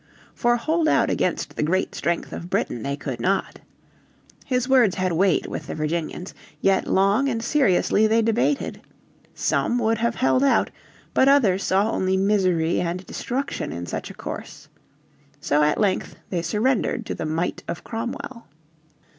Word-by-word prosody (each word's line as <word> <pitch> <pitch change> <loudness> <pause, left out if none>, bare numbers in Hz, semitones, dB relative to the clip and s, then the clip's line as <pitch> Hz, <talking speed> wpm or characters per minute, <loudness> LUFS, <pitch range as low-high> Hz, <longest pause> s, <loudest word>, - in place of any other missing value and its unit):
For 240 0 +2
hold 315 +6 0
out - - +3
against - - -1
the - - -2
great 180 +5 0
strength 170 0 -2
of 175 - -7
Britain 120 - -1
they 140 +2 -3
could 135 -4 -5
not. 195 +1 -1 0.8
His 250 -2 -1
words 250 -8 +4
had 185 -1 0
weight 180 +1 +2
with - - -6
the - - -5
Virginians. 160 +3 -3 0.3
Yet 195 -1 +2
long 200 +8 +3
and 230 -3 -2
seriously 220 -5 +3
they 225 +1 +3
debated. 235 +5 0 0.5
Some 240 - 0
would 225 -1 +1
have 235 +1 0
held 260 +1 +2
out, 275 - +3 0.4
but 265 - +4
others 210 -9 +4
saw 200 +4 +2
only 190 -3 +1
misery 185 -5 +2
and 180 +2 -3
destruction 270 +3 -3
in 85 +1 -5
such 85 - -5
a - - -10
course. - - -8 0.7
So 145 +1 +1
at 150 0 +2
length 200 -3 0 0.2
they 175 -3 0
surrendered 215 +8 0
to - - -3
the - - -4
might 165 +3 -2
of 170 - -5
Cromwell. 240 +2 -6
195 Hz, 160 wpm, -23 LUFS, 175-240 Hz, 0.8 s, words